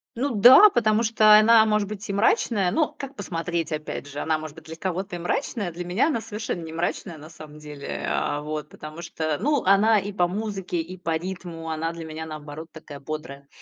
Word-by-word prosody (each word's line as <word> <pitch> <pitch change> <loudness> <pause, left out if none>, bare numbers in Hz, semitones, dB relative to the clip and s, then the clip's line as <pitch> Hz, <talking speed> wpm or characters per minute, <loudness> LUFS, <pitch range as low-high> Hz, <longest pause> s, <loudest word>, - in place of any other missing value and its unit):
Ну 265 +3 -1
да, 255 - +9
потому 225 - +2
что 215 -1 +6
она 220 +1 +6
может 210 -1 +1
быть 210 0 -7
и - - -1
мрачная, 200 -2 +2
но 315 - +1
как 275 0 -7
посмотреть, 170 - -3
опять 150 -2 -5
же. 145 +1 -7
Она 155 0 0
может 155 -1 -8
быть 160 -1 -14
для 160 - -8
кого-то 185 +2 -4
и - - -6
мрачная- 195 +1 -2
для 175 +2 -7
меня 185 - +1
она 285 -8 0
совершенно 210 -5 -5
не 160 0 -8
мрачная, 170 +1 -3
на 155 +2 -12
самом 155 -2 -12
деле, 150 -2 -6
а, 145 0 -1
вот. 150 0 -5
Потому 155 +2 -10
что, 155 -2 -3
ну, 285 +5 +1
она 205 +3 +4
и 200 +1 -5
по 180 -3 +1
музыке, 195 -2 -4
и 180 +3 -9
по 165 -2 -2
ритму 170 -1 -6
она 160 +1 -2
для 165 -1 -8
меня 160 0 -6
наоборот 155 +1 -8
такая 155 -3 -11
бодрая, 140 -1 -7
175 Hz, 210 wpm, -24 LUFS, 155-210 Hz, -, да